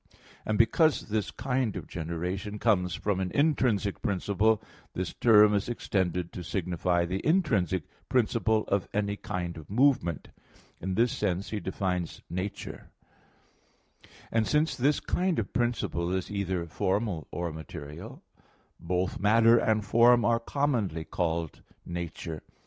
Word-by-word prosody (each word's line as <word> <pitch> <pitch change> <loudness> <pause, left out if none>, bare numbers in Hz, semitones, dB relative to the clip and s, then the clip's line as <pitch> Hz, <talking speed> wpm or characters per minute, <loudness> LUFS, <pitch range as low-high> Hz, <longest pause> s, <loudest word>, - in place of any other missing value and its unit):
And 110 - +1
because 150 +5 +3
this 105 -1 -1
kind 125 -3 -1
of - - -5
generation 90 +5 -4
comes 90 -6 +2
from 100 -2 -1
an 95 -1 -1
intrinsic 125 -9 +1
principle, 100 +2 +1 0.4
this 90 -1 -3
term 105 -3 +6
is 105 +2 0
extended 90 -6 -1
to 90 - -6
signify 85 0 0
the 95 +3 -3
intrinsic 110 - +2 0.3
principle 110 -3 +2
of 100 -2 0
any 100 -1 0
kind 90 -4 -4
of 80 -2 -11
movement. 115 - +2 0.5
In 95 +1 -3
this 115 +3 +3
sense 90 +2 -2
he 105 - -2
defines 90 -3 -3
"nature" 95 +3 -5
(Phys. - - -36
ii, - - -19
3). - - -26 0.2
And 115 -1 +1
since 150 -1 +2
this 140 +3 +2
kind 180 -1 0
of 105 - -2
principle 120 -8 -1
is 95 +1 -2
either 95 -4 -2
formal 95 - -1
or 85 -2 -3
material, 75 -1 -9 0.6
both 90 +2 -1
matter 115 +3 +5
and 110 -2 +1
form 120 +1 +5
are 115 0 +3
commonly 115 - -1
called 80 -1 -2 0.2
nature. 85 -2 -5
100 Hz, 140 wpm, -28 LUFS, 90-115 Hz, 0.6 s, term